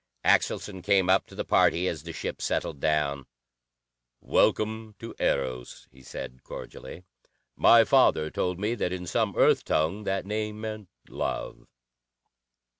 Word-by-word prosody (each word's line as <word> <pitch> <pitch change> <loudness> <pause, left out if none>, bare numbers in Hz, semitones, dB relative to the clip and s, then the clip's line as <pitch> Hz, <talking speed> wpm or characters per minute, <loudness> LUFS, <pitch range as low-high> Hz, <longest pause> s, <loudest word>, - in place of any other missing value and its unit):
Axelson 95 -3 +1
came 95 -1 +3
up 95 - +3
to - - -14
the - - -4
party 90 +2 +3
as 80 -5 -3
the 85 +2 -8
ship - - -5
settled 70 - -2
down. 70 -3 0 0.9
"Welcome 110 0 0
to 115 - -8
Eros," 65 -2 -2
he 65 +1 -18
said 65 -1 -8
cordially. 90 - -9 0.5
"My - - +7
father 80 0 +3
told 90 0 -2
me 105 +3 0
that 100 -6 -2
in 90 -1 -4
some 85 - -1
Earth - - +4
tongue 85 +7 0
that 95 -1 -1
name 105 +1 -3
meant 110 -3 -6 0.2
'love'." - - -5
90 Hz, 140 wpm, -27 LUFS, 75-105 Hz, 0.9 s, My